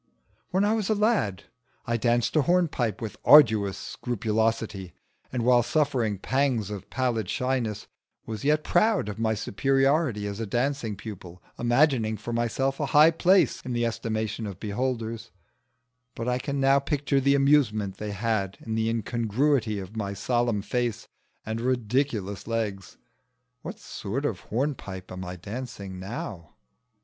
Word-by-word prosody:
When 190 +2 +2
I 210 - +2
was 220 -3 -1
a 215 - +3
lad 205 - +1 0.4
I 115 - 0
danced 120 +3 +1
a 155 - +5
hornpipe 145 - +1
with 110 - -5
arduous 110 -9 +6
scrupulosity, 110 -4 -2 0.4
and 120 -2 -2
while 125 -1 +6
suffering 120 -6 0
pangs 125 -2 0
of 100 -2 -7
pallid 120 -6 -1
shyness 125 -5 -1 0.4
was 110 -2 -6
yet 150 +1 +2
proud 205 - +2
of 105 - -6
my 110 -1 +1
superiority 135 +1 +1
as 100 +1 -4
a 115 - -3
dancing 120 -1 -1
pupil, 90 -4 -10 0.2
imagining 120 -3 +2
for 115 +3 -6
myself 125 +4 0
a 145 - 0
high 150 +3 +6
place 185 +3 +3
in 125 - -5
the 120 0 +1
estimation 110 -1 -2
of 100 -3 -8
beholders; 115 0 -3 0.9
but 115 - -4
I 125 0 +1
can 140 +2 -3
now 135 +1 +5
picture 140 0 0
the 140 +1 +3
amusement 125 -9 +2
they 105 - -5
had 100 -2 -1
in 110 - -5
the 110 0 +1
incongruity 115 +1 0
of 95 +2 -7
my 100 -2 -3
solemn 120 0 0
face 120 -2 -2 0.4
and 110 +1 -3
ridiculous 120 -5 -1
legs. 105 -5 -3 0.6
What - - -7
sort 135 +9 -5
of 110 -11 -1
hornpipe 110 -7 -4
am 95 0 -6
I 90 0 -6
dancing 100 -1 -7
now? 95 -5 -7
115 Hz, 150 wpm, -26 LUFS, 105-135 Hz, 0.9 s, arduous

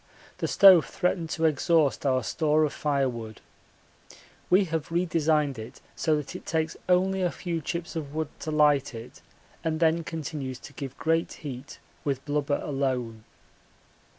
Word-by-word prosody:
The - - -1
stove 190 -5 +7
threatened 180 -2 -1
to 160 +1 0
exhaust 155 -1 +2
our 130 -1 +2
store 155 +4 +2
of 150 - 0
firewood. 125 -7 -2 1.1
We 190 +3 +5
have 160 -3 -3
redesigned 155 -5 +1
it 110 +3 -9 0.2
so 155 -2 +1
that 150 -2 -4
it - - -7
takes 160 -1 -1
only 190 +1 +3
a 180 - +2
few 170 -2 -4
chips 170 +3 -4
of 150 -2 -5
wood 160 -2 -1
to - - -5
light 150 -4 +3
it 115 +2 -10 0.4
and 160 -1 -1
then 165 0 +3
continues 150 -5 -5
to - - -12
give 135 -2 -7
great 165 +1 +1
heat 135 0 -7 0.3
with 140 -2 -2
blubber 145 0 0
alone. 125 -6 -2
150 Hz, 150 wpm, -27 LUFS, 135-165 Hz, 1.1 s, stove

